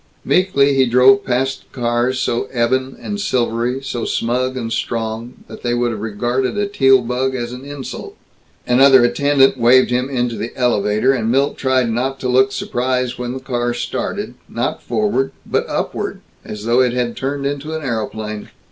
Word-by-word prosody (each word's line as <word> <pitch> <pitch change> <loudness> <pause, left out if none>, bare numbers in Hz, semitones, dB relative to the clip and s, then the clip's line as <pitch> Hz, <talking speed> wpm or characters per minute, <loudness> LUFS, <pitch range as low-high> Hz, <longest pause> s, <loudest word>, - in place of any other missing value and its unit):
Meekly 145 -7 +3
he 135 -1 +3
drove 130 +2 +5
past 130 +2 -1
the - - -13
cars 120 +2 +1
so 120 +2 -1
ebon 130 +2 0
and 205 0 -4
silvery, 125 - -1
so 120 -3 -4
smug 125 +2 -1
and 115 -2 -3
strong, 115 +1 -4
that - - -11
they 120 -1 0
would 120 0 0
have 110 - -5
regarded 120 - -1
a 205 - +1
Teal 135 -10 +4
bug 130 +2 -1
as 120 -1 -4
an 125 +1 -8
insult. 140 -2 -8 0.5
Another 130 +1 +6
attendant 135 +1 +3
waved 125 +2 +5
him 125 +2 0
into 120 -3 -1
the 115 - -6
elevator, 120 0 +2
and 115 -4 -1
Milt 135 +4 +2
tried 130 -3 +1
not 130 +4 -2
to 130 - -1
look 130 +2 +3
surprised 125 -1 -2
when 125 0 -3
the 130 - -5
car 120 -2 -2
started, - - -3 0.2
not - - -2
forward, 120 +3 0
but - - -1
upward, - - -3 0.2
as 105 0 -8
though 120 +2 +3
it 125 -2 +2
had 125 -1 -1
turned 140 +1 -3
into 145 +3 -3
an 160 - -5
aeroplane. 110 -3 -4
125 Hz, 175 wpm, -18 LUFS, 120-135 Hz, 0.5 s, Another